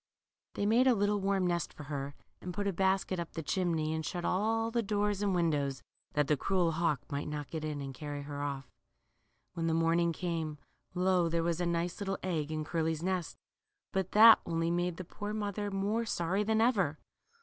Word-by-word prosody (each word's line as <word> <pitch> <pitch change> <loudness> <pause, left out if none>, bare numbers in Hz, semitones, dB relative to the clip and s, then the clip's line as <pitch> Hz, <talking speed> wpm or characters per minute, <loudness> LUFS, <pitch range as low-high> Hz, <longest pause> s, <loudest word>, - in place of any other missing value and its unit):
They 205 - -1
made 235 +5 +4
a 250 - +5
little 205 0 +1
warm 195 -1 +1
nest 175 -2 -1
for 150 - -9
her^ 140 -1 -4 0.3
and 180 -1 -6
put 205 - -1
a 200 - 0
basket 190 0 +1
up 170 - -5
the 165 - -4
chimney, 160 -2 0
and 160 0 -2
shut 175 +2 -3
all 225 +4 +1
the 235 0 +1
doors 205 -1 0
and 200 -2 +1
windows, 145 -7 0 0.3
that 150 0 +2
the 150 - +3
cruel 180 +3 +1
hawk 165 -3 0
might 140 +1 -2
not 150 -3 -5
get 160 -2 -4
in 150 -2 -3
and 135 -1 -5
carry 145 +1 -6
'her 145 0 -5
off. 140 -2 -3 0.9
When 165 -2 -2
the 160 - +2
morning 165 +1 +3
came, 165 -3 -3 0.4
lo, 180 -1 +3
there 165 0 0
was 170 +1 0
a 175 - +1
nice 170 0 -1
little 195 -1 -1
egg 160 -5 -1
in 155 -1 -2
Curly's 160 -1 -1
nest! 185 -3 -2 0.6
But 190 -1 -1
that 220 +2 +9
only 165 0 -1
made 175 0 0
the 185 - -5
poor 205 +4 -5
mother 205 -1 -2
more 200 +4 0
sorry 180 +1 0
than 220 +1 +2
ever. 195 - +2
175 Hz, 205 wpm, -32 LUFS, 155-195 Hz, 0.9 s, that